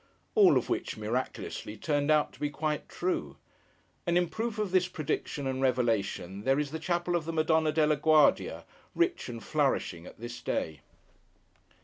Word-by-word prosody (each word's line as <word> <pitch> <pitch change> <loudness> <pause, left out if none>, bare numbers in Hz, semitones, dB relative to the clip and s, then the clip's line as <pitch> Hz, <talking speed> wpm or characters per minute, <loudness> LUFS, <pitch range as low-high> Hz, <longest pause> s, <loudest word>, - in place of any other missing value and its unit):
All 405 -5 +6
of - - -1
which - - -2
(miraculously) - - -3
turned 145 -2 0
out 155 -1 +3
to - - -17
be 145 - 0
quite 150 0 -2
true. 180 +1 -2 0.7
And 170 0 +3
in 175 -1 +2
proof 220 +5 -3
of 210 -3 -1
this 185 -1 +3
prediction 155 -4 -3
and 130 0 -2
revelation, 110 -7 0
there 135 +2 +3
is 145 -1 -1
the 160 - -4
chapel 175 +1 0
of 165 -3 -1
the 165 - -2
Madonna 160 0 +2
della 150 -1 +3
Guardia, 155 0 +3 0.3
rich 345 - +1
and 115 -3 -7
flourishing 130 - 0
at - - -13
this 120 +1 -7
day. 80 -2 -2
155 Hz, 165 wpm, -30 LUFS, 130-175 Hz, 0.7 s, All